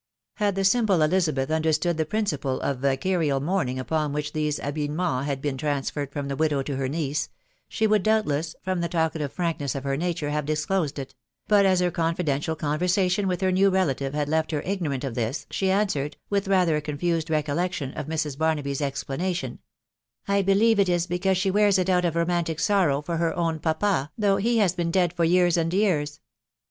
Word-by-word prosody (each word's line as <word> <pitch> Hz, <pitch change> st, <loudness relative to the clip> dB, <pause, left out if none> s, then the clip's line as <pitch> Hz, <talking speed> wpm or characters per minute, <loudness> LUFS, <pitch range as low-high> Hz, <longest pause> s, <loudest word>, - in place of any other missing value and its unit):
" -, -, -66 dB
Had 200 Hz, -2 st, +2 dB
the 195 Hz, -, 0 dB
simple 195 Hz, -5 st, +3 dB
Elizabeth 155 Hz, -4 st, +1 dB
understood 160 Hz, +1 st, +1 dB
the 160 Hz, -1 st, 0 dB
principle 150 Hz, -11 st, -1 dB
of 140 Hz, -3 st, -1 dB
ft 135 Hz, 0 st, 0 dB
carial 165 Hz, -7 st, +1 dB
mourning 140 Hz, -4 st, -1 dB
upon 150 Hz, +2 st, -1 dB
which 150 Hz, 0 st, -3 dB
these 150 Hz, -1 st, -1 dB
habiliments 145 Hz, 0 st, -2 dB
had 135 Hz, -2 st, -3 dB
been 145 Hz, -2 st, -1 dB
traav 145 Hz, -1 st, -1 dB
ferred 145 Hz, -2 st, -4 dB
from 140 Hz, -1 st, -4 dB
the 140 Hz, -, -3 dB
widow 150 Hz, -2 st, +1 dB
to 140 Hz, 0 st, -4 dB
her 135 Hz, 0 st, -1 dB
niece, 150 Hz, 0 st, -2 dB, 0.4 s
she 220 Hz, -, 0 dB
would 215 Hz, -2 st, +3 dB
rtmilnVas, 170 Hz, -8 st, +1 dB
torn 185 Hz, -1 st, -1 dB
the 170 Hz, 0 st, -1 dB
talkative 160 Hz, -4 st, -1 dB
frankness 165 Hz, -6 st, -2 dB
of 135 Hz, -, -4 dB
her 140 Hz, -1 st, -1 dB
nature, 165 Hz, -1 st, -2 dB
hare 150 Hz, 0 st, 0 dB
dffrlnmd 155 Hz, +1 st, -1 dB
it; 135 Hz, -1 st, -6 dB, 0.4 s
1st 205 Hz, -1 st, +6 dB
as 185 Hz, -1 st, +4 dB
her 180 Hz, -1 st, +1 dB
confidential 160 Hz, -2 st, -1 dB
conTersation 180 Hz, +6 st, +1 dB
with 180 Hz, 0 st, -1 dB
her 190 Hz, -1 st, +2 dB
new 195 Hz, +2 st, +4 dB
relative 145 Hz, -7 st, 0 dB
had 150 Hz, -1 st, 0 dB
let 160 Hz, +1 st, 0 dB
her 150 Hz, -3 st, -2 dB
ignorant 165 Hz, -9 st, -2 dB
of 135 Hz, -4 st, -3 dB
this, 120 Hz, +4 st, -2 dB
she 190 Hz, -, 0 dB
answered, 170 Hz, -8 st, 0 dB
with 200 Hz, -1 st, 0 dB
rather 180 Hz, -5 st, +3 dB
a -, -, -2 dB
contend 160 Hz, +2 st, -2 dB
recollection 155 Hz, -1 st, -1 dB
of 145 Hz, -, -5 dB
Mrs. 155 Hz, -3 st, -2 dB
Barnaby*s 150 Hz, -3 st, 0 dB
explanation, 145 Hz, +6 st, -3 dB, 0.7 s
I 200 Hz, 0 st, +2 dB
bdic'tw 200 Hz, +3 st, +3 dB
it 195 Hz, -2 st, +3 dB
ii 175 Hz, -1 st, +1 dB
became 185 Hz, +2 st, +1 dB
she 190 Hz, +1 st, +1 dB
wears 205 Hz, 0 st, +4 dB
it 185 Hz, 0 st, +1 dB
out 180 Hz, -1 st, +2 dB
of 170 Hz, -2 st, 0 dB
romantic 170 Hz, -1 st, 0 dB
sorrow 175 Hz, -9 st, +2 dB
for 170 Hz, +2 st, -2 dB
her 165 Hz, 0 st, 0 dB
own 165 Hz, -2 st, 0 dB
pan, 160 Hz, -2 st, 0 dB
though 200 Hz, -3 st, +2 dB
he 230 Hz, +4 st, +1 dB
has 195 Hz, -6 st, +3 dB
been 175 Hz, -2 st, -2 dB
dead 175 Hz, -1 st, +2 dB
for 170 Hz, -1 st, +1 dB
years 175 Hz, 0 st, +3 dB
and 165 Hz, 0 st, 0 dB
years.' 160 Hz, -7 st, 0 dB
160 Hz, 200 wpm, -25 LUFS, 145-185 Hz, 0.7 s, 1st